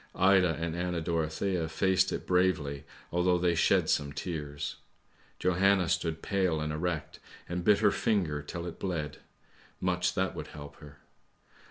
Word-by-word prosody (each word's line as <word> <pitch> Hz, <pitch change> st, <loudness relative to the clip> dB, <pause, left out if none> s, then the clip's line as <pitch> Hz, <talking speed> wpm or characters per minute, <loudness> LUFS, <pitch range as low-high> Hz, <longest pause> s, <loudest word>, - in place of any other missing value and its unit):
Ida 95 Hz, -3 st, +4 dB
and 80 Hz, 0 st, -2 dB
Anna 90 Hz, 0 st, -1 dB
Dorothea 85 Hz, +2 st, -1 dB
faced 95 Hz, +3 st, +2 dB
it -, -, -4 dB
bravely 85 Hz, -6 st, +1 dB, 0.3 s
although 90 Hz, +1 st, +3 dB
they 90 Hz, 0 st, +2 dB
shed 85 Hz, -, +3 dB
some 70 Hz, -1 st, +1 dB
tears; 75 Hz, -3 st, -4 dB, 0.6 s
Johanna 90 Hz, 0 st, +3 dB
stood 80 Hz, -1 st, -1 dB
pale 95 Hz, -6 st, +1 dB
and 75 Hz, 0 st, -2 dB
erect 80 Hz, 0 st, -3 dB, 0.3 s
and 90 Hz, 0 st, -3 dB
bit 105 Hz, +2 st, +4 dB
her 105 Hz, -2 st, +5 dB
finger 90 Hz, -12 st, 0 dB
till 85 Hz, +4 st, -6 dB
it 85 Hz, -, -7 dB
bled! 80 Hz, -7 st, -3 dB, 0.6 s
much 90 Hz, -1 st, 0 dB
that 95 Hz, 0 st, 0 dB
would -, -, -6 dB
help 75 Hz, -1 st, -10 dB
her! 75 Hz, 0 st, -13 dB
85 Hz, 150 wpm, -30 LUFS, 80-95 Hz, 0.6 s, her